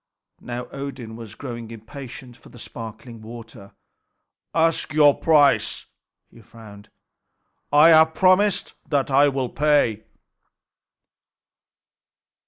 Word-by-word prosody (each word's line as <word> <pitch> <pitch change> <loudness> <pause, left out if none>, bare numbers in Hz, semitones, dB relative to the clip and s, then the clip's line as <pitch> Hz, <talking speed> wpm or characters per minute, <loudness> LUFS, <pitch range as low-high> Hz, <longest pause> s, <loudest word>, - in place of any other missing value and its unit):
Now 120 0 -6
Odin 130 -5 -7
was 115 -2 -11
growing 120 -4 -8
impatient 120 +2 -11
for - - -18
the - - -16
sparkling 115 0 -10
water. 110 -3 -12 0.8
"Ask 165 -2 +1
your 145 -2 +6
price," 150 -3 +2 0.5
he 115 - -17
frowned. 105 -2 -15 0.8
"I 150 +3 +6
have 160 0 +5
promised 190 +2 +2 0.2
that 140 -2 0
I 140 +2 +5
will 135 -2 -3
pay." 145 -8 +1
125 Hz, 100 wpm, -22 LUFS, 115-145 Hz, 0.8 s, your